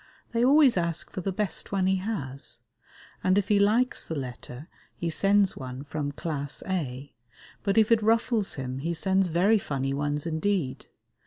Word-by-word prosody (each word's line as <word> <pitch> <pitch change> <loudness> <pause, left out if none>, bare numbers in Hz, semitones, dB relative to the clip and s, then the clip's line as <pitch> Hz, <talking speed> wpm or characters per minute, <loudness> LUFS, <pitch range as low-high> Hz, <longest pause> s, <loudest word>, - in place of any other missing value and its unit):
They 235 0 +1
always 275 -3 +6
ask 170 -2 -1
for 190 - -4
the 195 - -2
best 205 +1 -2
one 195 -2 +1
he 190 0 +2
has, 140 - -4 0.7
and 185 +1 +3
if 205 - 0
he 205 -1 +4
likes 225 +5 +2
the 160 - -4
letter 130 +1 -7 0.3
he 170 -1 -3
sends 200 +2 +3
one 130 0 -7
from 145 -1 -3
Class 145 -2 -4
A; 145 -7 -3 0.5
but 200 +1 0
if 220 0 +4
it 225 -1 +5
ruffles 225 -1 +1
him 130 -1 -4
he 170 +4 -2
sends 190 +2 +2
very 185 +6 +3
funny 135 -6 -2
ones 145 +1 -1
indeed. 165 -3 -1
175 Hz, 170 wpm, -27 LUFS, 145-205 Hz, 0.7 s, always